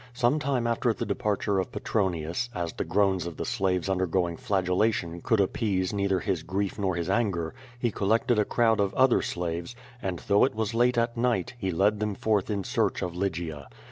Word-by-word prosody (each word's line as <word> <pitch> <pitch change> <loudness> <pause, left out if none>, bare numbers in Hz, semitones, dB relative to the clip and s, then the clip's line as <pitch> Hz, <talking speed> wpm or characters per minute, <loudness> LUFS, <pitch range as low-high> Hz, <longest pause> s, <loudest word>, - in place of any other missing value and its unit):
Some 125 +4 +2
time 140 -5 0
after 115 +1 +1
the - - -4
departure 100 -1 0
of 95 - -3
Petronius, 90 +1 -1
as 85 -2 -3
the - - -2
groans 95 -3 +1
of 85 - -7
the - - -3
slaves 95 -7 0
undergoing 90 -2 0
flagellation 95 -4 0
could 115 - +2
appease 95 -1 0
neither 100 -2 +1
his 95 -6 -1
grief 95 +4 -2
nor 95 -3 0
his 85 -1 -2
anger^ 95 -5 0 0.3
he 120 -1 0
collected 110 +3 +2
a - - +4
crowd 115 -1 +2
of 100 -1 0
other 130 -2 +4
slaves, 85 +4 -3 0.3
and, 95 -2 -2
though 100 0 +5
it 130 - +2
was 110 0 -1
late 120 +1 +3
at 115 0 +1
night, 115 -5 0
he 95 -4 -1
led 100 +4 +2
them 105 -1 -1
forth 105 -2 0
in 100 -2 -1
search 105 0 0
of 90 -1 -4
Lygia. 85 -6 -3
100 Hz, 195 wpm, -27 LUFS, 90-115 Hz, 0.3 s, though